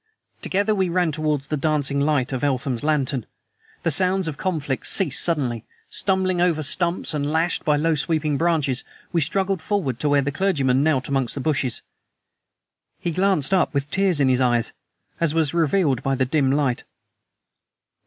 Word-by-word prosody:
Together 205 +3 0
we 190 -3 0
ran 175 -1 +1
towards 150 -2 -2
the 155 - 0
dancing 145 -2 0
light 140 -3 +1
of 130 - -3
Eltham's 130 -3 -1
lantern. 140 -5 0 0.6
The 165 - +1
sounds 185 +3 +2
of 155 - -3
conflict 150 -6 -2
ceased 165 -9 +3
suddenly. 130 -9 -1 0.3
Stumbling 185 -2 0
over 165 -3 +1
stumps 170 +3 -1
and 145 -1 -1
lashed 165 +2 0
by 150 -1 +2
low 165 +2 +1
sweeping 150 0 0
branches, 150 -5 0 0.3
we 170 - +2
struggled 190 +4 0
forward 160 - -2
to 150 - 0
where 145 -1 +3
the 140 - -2
clergyman 140 -7 +1
knelt 150 -3 +1
amongst 135 -3 -1
the - - -4
bushes. 135 -4 -1 1.2
He 170 - -2
glanced 185 -3 +1
up 180 -5 +2
with 140 +1 -2
tears 190 -5 +1
in 140 - +3
his 130 0 +2
eyes, 120 -2 +1 0.5
as 165 -2 +1
was 160 -3 +1
revealed 160 -5 +1
by 135 -1 0
the 130 0 +1
dim 135 0 +1
light. 140 -4 0
150 Hz, 170 wpm, -22 LUFS, 135-170 Hz, 1.2 s, ceased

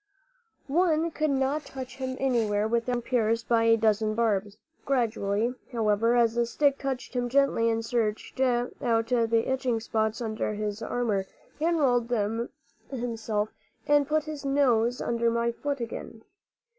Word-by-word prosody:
One 330 +2 +2
could 310 0 0
not 275 +2 0
touch 260 -2 -8
him 260 -1 -4
anywhere 220 -6 +1
without 235 +2 0
being 240 - -1
pierced 230 -2 0
by 230 -1 +3
a 225 0 +5
dozen 215 -1 +1
barbs. 210 -3 0 0.3
Gradually, 230 -3 0 0.2
however, 225 0 +2
as 235 -2 +3
the 235 0 +1
stick 280 +3 +1
touched 265 -2 -4
him 245 -1 0
gently 270 -3 +3
and 225 0 -1
searched 225 +1 -2
out 245 -1 +1
the 230 -1 +2
itching 260 -3 0
spots 220 0 -1
under 220 -2 -2
his 210 +1 -3
armor, 210 -6 -1 0.3
he 310 - 0
unrolled 265 -8 +2 0.8
himself 225 -4 -2 0.4
and 290 -1 +3
put 310 0 +1
his 305 -2 -7
nose 250 -4 +2
under 235 0 +1
my 235 0 +1
foot 280 +3 -3
again. 225 -1 -7
235 Hz, 145 wpm, -27 LUFS, 225-265 Hz, 0.8 s, a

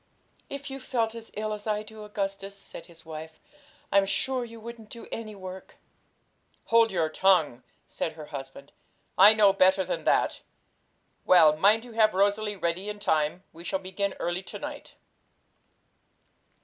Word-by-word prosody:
'If 280 0 -6
you 270 - -6
felt 230 -4 -1
as 230 -1 -9
ill 215 +1 -2
as 210 0 -7
I 210 0 0
do, 215 0 -11
Augustus,' 195 -1 -4
said 195 - -10
his 165 -1 -15
wife, 160 0 -9 0.5
'I'm 200 0 +4
sure 255 +5 0
you 230 -1 -10
wouldn't 225 -1 -10
do 235 - -9
any 215 -2 -6
work.' 185 -1 -9 0.9
'Hold 230 -1 +4
your 170 -4 +1
tongue!' 155 -7 +2 0.2
said 160 - -4
her 155 -1 -9
husband; 135 0 -8 0.5
'I 205 +3 +9
know 205 -2 +5
better 190 -1 +4
than - - -3
that. - - +2 0.8
Well, 160 -4 +6
mind 210 +8 +4
you 245 - -11
have 220 -3 +3
Rosalie 205 +2 +1
ready 185 +2 -2
in 210 - -5
time; 160 -2 0
we 165 +1 -11
shall 175 - -1
begin 190 +1 -3
early 175 +1 -2
to 190 - -8
night.' 295 -1 -8
200 Hz, 160 wpm, -27 LUFS, 175-220 Hz, 0.9 s, I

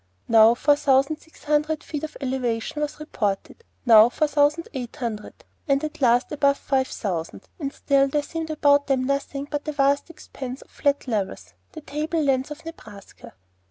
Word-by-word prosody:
Now 225 0 +6
four 290 +4 +3
thousand 275 +1 +2
six 320 - -21
hundred 300 +1 0
feet 300 -1 -5
of 310 - -6
elevation 255 0 -2
was 300 0 -3
reported, 215 - -3 0.2
now 225 -1 +8
four 305 +5 0
thousand 295 +3 +2
eight 250 -4 -6
hundred, 225 -4 -6 0.3
at 285 +2 0
last 245 0 +3
above 280 -1 +2
five 265 -2 0
thousand; 175 -6 -5
and 280 -3 -3
still 275 -1 +2
there 290 +2 -1
seemed 325 +1 -5
about 285 -2 +3
them 265 -2 +1
nothing 280 +1 -2
but 295 0 -3
a - - 0
vast 280 +1 +1
expanse 265 -5 -8
of - - -30
flat 285 -1 0
levels, 205 -5 -3 0.2
the 315 - -8
table 305 +3 -3
lands 270 -1 +1
of 300 +2 -9
Nebraska. 210 - -12
280 Hz, 170 wpm, -24 LUFS, 250-300 Hz, 0.3 s, now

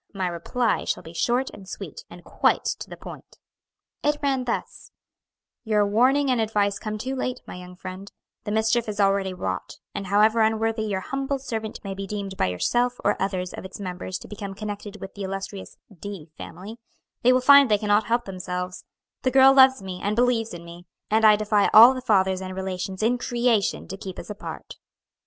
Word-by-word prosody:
My 190 -1 -1
reply 210 +7 -1
shall - - -2
be 165 - -11
short 245 +9 0
and 190 -1 -12
sweet, - - -8
and - - -12
quite - - +1
to - - -8
the - - -9
point." - - -11 0.7
It 295 0 +2
ran 270 -2 +1
thus: 240 - -4 0.7
"Your 210 -2 +2
warning 260 +7 +3
and 245 -3 +2
advice 205 -2 0
come 215 0 -4
too 260 +5 -4
late, 255 -1 -3
my - - -8
young 180 0 -10
friend; 185 +2 -9 0.3
the 210 - -4
mischief 220 +1 +1
is 210 0 -5
already 195 -1 +2
wrought, 95 - -4 0.2
and 195 - -5
however 215 +3 +4
unworthy 220 0 +1
your 195 -3 -2
humble 275 +4 -2
servant 225 -5 -5
may 195 -1 -4
be 195 0 -6
deemed 200 -1 -5
by - - +1
yourself 240 - 0
or 205 - +3
others 185 -2 -2
of - - -7
its 190 +1 -9
members 185 -1 -5
to - - -12
become 200 -2 -7
connected 210 0 -6
with 195 - -8
the 205 - -9
illustrious 195 0 -6 0.2
D 190 -6 -8
family, 205 +10 -9 0.4
they 250 - +5
will 255 - +4
find 280 0 +7
they 210 - +4
cannot 210 0 +2
help 235 +1 0
themselves; 180 -1 -5 0.4
the 255 - +1
girl 265 +1 +7
loves 265 -5 +6
me, 185 -1 -6
and 205 +1 -1
believes 235 -1 +1
in 170 -1 -9
me, 170 +1 -12 0.2
and 220 +1 +3
I 215 -1 +8
defy 210 -1 +2
all 235 +4 +10
the 255 - -5
fathers 190 -5 +2
and 185 0 -6
relations 190 +1 -4
in 245 +2 +2
creation 240 -4 0
to 195 - -6
keep 190 -2 -8
us 185 - -7
apart." 210 - -8
210 Hz, 195 wpm, -24 LUFS, 190-235 Hz, 0.7 s, all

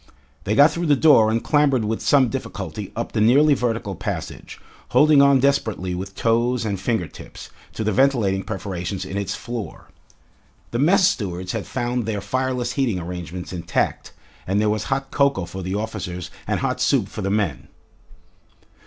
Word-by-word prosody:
They 105 - 0
got 145 +5 +7
through 170 +1 -2
the 145 - +5
door 135 -7 +5
and 115 +1 0
clambered 140 -6 +2
with 110 +1 -2
some 135 -3 +4
difficulty 115 - -5
up - - -3
the - - 0
nearly 140 +7 +5
vertical 115 -6 -2
passage, - - -6 0.3
holding 150 -2 +5
on 140 -1 +5
desperately 125 -10 0
with 95 +2 -6
toes 115 +2 +1
and 100 -3 -2
finger 110 -2 -1
tips, - - -12 0.2
to 110 - -3
the 110 - 0
ventilating 110 -6 +2
perforations 95 -2 -4
in 95 - -7
its 100 -1 -2
floor. 115 -7 -7 0.8
The 120 - -2
mess 180 +6 +5
stewards 90 - -2
had 105 -7 -4
found 120 -1 -2
their 105 -2 -1
fireless 125 +3 -2
heating 125 -7 0
arrangements 90 +1 -6
intact, 85 -1 -2 0.4
and 95 +2 +1
there 105 0 +2
was 105 -1 -2
hot 135 0 -2
cocoa 140 -10 +1
for 95 +2 -7
the 95 +2 -3
officers 100 -5 -5 0.2
and - - -1
hot - - -1
soup - - +2
for - - -7
the 95 - -1
men. 100 -10 -1
110 Hz, 170 wpm, -22 LUFS, 95-130 Hz, 0.8 s, got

